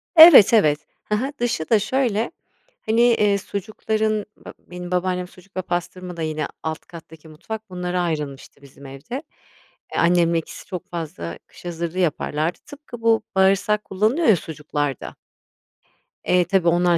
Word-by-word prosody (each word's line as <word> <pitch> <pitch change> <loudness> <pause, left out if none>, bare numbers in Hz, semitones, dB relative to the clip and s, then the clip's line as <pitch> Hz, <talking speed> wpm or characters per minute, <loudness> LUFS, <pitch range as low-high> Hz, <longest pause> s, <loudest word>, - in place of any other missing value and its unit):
Evet, 315 - +10
evet, 150 -9 +3 0.2
hı 210 - 0
hı, 265 +6 -2
dışı 230 -10 -1
da 225 - +5
şöyle 240 +1 0 0.5
hani, 225 +2 +2
iii, 205 -2 +2
sucukların, 215 +1 -2
ba - - -11
benim 180 0 -9
babaannem 180 0 -1
sucuk 185 +1 -17
ve - - +1
pastırma 175 0 -4
da - - -5
yine 155 -1 -2 0.2
alt 160 +1 -3
kattaki 160 -1 -13
mutfak 190 +8 -8
bunlara 180 0 -2
ayrılmıştı 150 -5 -4
bizim 140 0 -15
evde. 140 - -7 0.7
Eee, - - -1
annemle 170 -1 +3
ikisi 160 - -10
çok 180 -2 -7
fazla 145 - -5
kış - - -17
hazırlığı 170 +1 -4
yaparlardı. 155 -1 -1
Tıpkı 285 -5 -11
bu 225 -1 +3
bağırsak 195 +2 +3
kullanılıyor 220 - +1
ya 215 - +7
sucuklarda. 150 -4 -4 1.1
Eee, 180 0 +3
tabii 180 0 +1
onlar 175 0 +3
180 Hz, 150 wpm, -22 LUFS, 160-215 Hz, 1.1 s, Evet